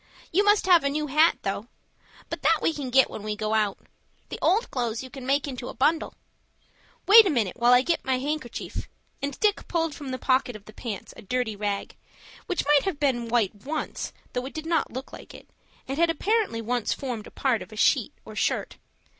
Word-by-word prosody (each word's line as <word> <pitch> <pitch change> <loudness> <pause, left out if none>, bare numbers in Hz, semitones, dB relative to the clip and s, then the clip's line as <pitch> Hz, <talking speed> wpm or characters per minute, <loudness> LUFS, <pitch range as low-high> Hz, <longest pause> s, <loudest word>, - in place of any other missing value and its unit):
You 390 +5 +3
must 415 0 +4
have 355 -4 +6
a 280 - +2
new 300 +2 -1
hat 305 +4 +4
though. 200 +3 -3 0.6
But - - -5
that - - +4
we 330 - +1
can 285 -4 -5
get 265 +1 +5
when - - -8
we 210 0 -3
go 215 0 -2
out. 210 -3 +1 0.5
The - - -6
old 435 +6 +2
clothes 235 -2 -2
you 260 - -10
can 265 -2 -8
make 280 +2 +2
into 250 -2 -6
a - - -8
bundle." 315 +4 +1 0.9
"Wait 430 +1 +9
a - - +2
minute 230 - 0
till 240 - -3
I 250 +1 +7
get 335 +3 0
my 260 -1 +1
handkercher," 290 -1 -4 0.4
and 280 -1 -4
Dick 420 -1 +1
pulled 330 -3 0
from 285 -3 -8
the 255 - -3
pocket 255 -2 +1
of 210 -1 -11
the 215 - -13
pants 215 -4 -6
a - - -11
dirty 245 0 -2
rag, 205 -1 -3 0.5
which 365 - -1
might 290 0 +4
have 370 -7 -2
been 255 -5 +1
white 230 -4 +1
once, 290 +9 -4 0.2
though 250 +1 -2
it - - -11
did 315 0 -5
not 330 0 0
look 260 +2 -7
like - - -11
it, - - -13 0.4
and 270 +3 -3
had 335 0 +4
apparently 385 - 0
once 240 0 0
formed 245 -6 -5
a - - -10
part - - 0
of - - -10
a - - -10
sheet - - +2
or - - -10
shirt. - - -1
265 Hz, 220 wpm, -26 LUFS, 235-315 Hz, 0.9 s, Wait